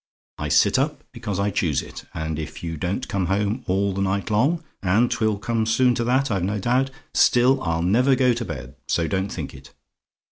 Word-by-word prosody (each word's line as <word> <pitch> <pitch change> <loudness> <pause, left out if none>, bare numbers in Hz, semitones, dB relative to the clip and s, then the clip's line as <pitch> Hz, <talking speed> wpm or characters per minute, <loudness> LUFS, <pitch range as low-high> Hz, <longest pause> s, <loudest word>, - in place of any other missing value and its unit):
I - - -2
sit - - +4
up - - -1
because 100 -2 -4
I 100 +1 +1
choose 80 -6 0
it; - - -10
and 80 0 -4
if 75 +1 -7
you 80 -1 -3
don't 95 - -3
come 95 -3 -1
home 105 +6 0
all 100 +1 +1
the 100 - -2
night 100 +2 -1
long 145 +11 +2 0.2
and 105 +6 +2
'twill 110 -2 0 0.3
soon 120 +3 +2
come - - +4
to 120 - -1
that, 130 +1 +1
I've 95 -3 0
no 100 +3 -1
doubt 125 +6 +1 0.2
still, 125 +2 +4
I'll 80 0 -1
never 125 +9 +3
go 125 -1 +3
to 120 0 -3
bed, 70 - -7
so 85 -1 +1
don't 95 +2 -1
think - - -5
it. - - -14
100 Hz, 210 wpm, -23 LUFS, 90-120 Hz, 0.3 s, sit